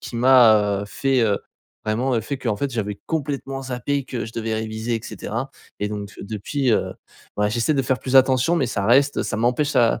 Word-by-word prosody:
qui 120 - -7
m'a, 110 -5 +5
heu, - - -4
fait, 135 +4 0
heu, 105 -3 +2 0.5
vraiment, 120 +5 0
heu - - +1
fait 140 +4 -4
qu'en 115 -5 -1
fait, 140 +4 -2
j'avais 105 -3 -3
complètement 140 -3 -3
zappé 130 +2 -2
que 120 -4 -4
je 110 - -10
devais 115 -1 -2
réviser 110 +1 -3
et - - -6
cetera. 115 +4 -5 0.3
Et 105 - 0
donc, 105 -1 -6
depuis, 110 +6 -2
heu, - - 0 0.5
ouais 105 0 +2
j'essaie 120 +7 +1
de 135 - +1
faire 130 -1 0
plus 130 0 +1
attention, 130 +5 +4
mais 135 - +1
ça 105 -4 -2
reste 140 +4 +4
ça 110 - -3
m'empêche 125 +6 +1
ça 120 -4 +3
120 Hz, 210 wpm, -22 LUFS, 110-135 Hz, 0.5 s, m'a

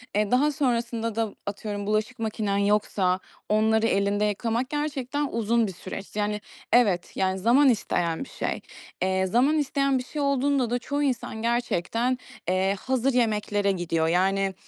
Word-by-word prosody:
e, 210 -1 +1
daha 280 +4 +4
sonrasında 235 -5 -1
da 225 -2 -1
atıyorum, 205 0 -4
bulaşık 215 +4 -1
makinen 215 -2 -1
yoksa 200 -2 +1 0.3
onları 220 +1 +3
elinde 200 0 +1
yıkamak, 230 +5 -1
gerçekten 295 -1 -2
uzun 230 0 +1
bir 190 - -6
süreç. 190 +3 -8
Yani, 210 0 -1 0.3
evet, 200 -8 +3
yani, 190 0 0
zaman 250 +8 +5
isteyen 175 -7 0
bir - - -12
şey. - - -3 0.4
Eee, 190 0 +1
zaman 250 +11 +3
isteyen 275 -2 +1
bir 255 - -3
şey 295 +4 -5
olduğunda 280 -2 +1
da 245 +1 0
çoğu 285 +4 -2
insan 250 -5 -2
gerçekten, 235 +1 0 0.3
eee, 190 +2 +2
hazır 260 +2 0
yemeklere 210 -4 +1
gidiyor. 165 -3 0
Yani, 190 +3 +2
220 Hz, 150 wpm, -26 LUFS, 200-255 Hz, 0.4 s, zaman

